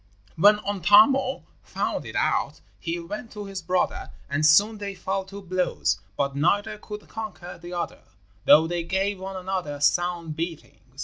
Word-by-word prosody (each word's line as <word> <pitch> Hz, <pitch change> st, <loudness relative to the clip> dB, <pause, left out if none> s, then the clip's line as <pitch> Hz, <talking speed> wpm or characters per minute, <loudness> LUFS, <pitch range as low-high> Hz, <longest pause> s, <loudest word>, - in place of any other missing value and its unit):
When 205 Hz, +5 st, +6 dB
Untamo 210 Hz, -, +4 dB, 0.2 s
found -, -, -3 dB
it -, -, -8 dB
out -, -, 0 dB, 0.2 s
he 170 Hz, 0 st, -3 dB
went 210 Hz, +7 st, -7 dB
to 210 Hz, -1 st, -6 dB
his 195 Hz, -1 st, -6 dB
brother, 180 Hz, +2 st, -1 dB, 0.2 s
and 150 Hz, +2 st, 0 dB
soon 205 Hz, +8 st, +5 dB
they 200 Hz, -1 st, -5 dB
fell 190 Hz, 0 st, -3 dB
to 200 Hz, +1 st, -10 dB
blows; 185 Hz, -, 0 dB, 0.2 s
but 140 Hz, -1 st, -1 dB
neither 200 Hz, +9 st, +1 dB
could 210 Hz, 0 st, -9 dB
conquer 210 Hz, -6 st, -7 dB
the 175 Hz, +1 st, -9 dB
other, 175 Hz, -1 st, -4 dB, 0.4 s
though 155 Hz, +2 st, +7 dB
they 175 Hz, +1 st, -2 dB
gave 190 Hz, +3 st, -1 dB
one 190 Hz, +1 st, -6 dB
another 185 Hz, -6 st, -3 dB
sound 170 Hz, +1 st, +1 dB
beatings. 165 Hz, 0 st, -7 dB
185 Hz, 160 wpm, -25 LUFS, 170-205 Hz, 0.4 s, though